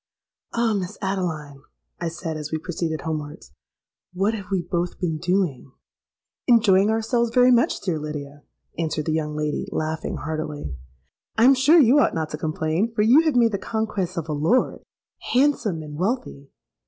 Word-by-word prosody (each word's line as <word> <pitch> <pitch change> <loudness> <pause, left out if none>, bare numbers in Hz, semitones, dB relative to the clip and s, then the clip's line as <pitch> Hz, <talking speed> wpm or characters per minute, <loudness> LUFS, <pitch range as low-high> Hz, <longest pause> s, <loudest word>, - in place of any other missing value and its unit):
'Ah! 235 -1 +2
Miss 195 0 -3
Adeline,' 160 -8 -3 0.4
I - - -2
said, 165 0 -5
as 155 -1 -6
we 160 - 0
proceeded 160 -1 -3
homewards, 155 0 -6 0.6
'what 195 +4 +1
have 200 -4 -6
we 185 -3 0
both 175 0 -3
been 160 -4 -2
doing?'—'Enjoying 190 - 0
ourselves 225 +2 +1
very 250 +1 +5
much, 240 -1 +2
dear 175 -5 -1
Lydia,' 145 -1 -7 0.4
answered 155 -2 -1
the 160 - -1
young 150 -1 -2
lady, 150 -1 -2
laughing 155 0 -3
heartily. 150 - -4 0.6
'I 225 - +4
am 270 - +8
sure 270 +6 +5
you 270 +1 +6
ought - - +2
not 160 -1 -2
to 150 - -4
complain, 160 +7 -1
for 210 - +2
you 250 +8 +6
have 310 -5 +1
made 235 -2 +4
the 200 - -2
conquest 205 -5 -3
of 165 -2 -3
a 155 - -2
lord, 160 - +1 0.5
handsome, 245 - +2
and 150 0 -8
wealthy.' 190 - -2
175 Hz, 165 wpm, -23 LUFS, 155-220 Hz, 0.6 s, am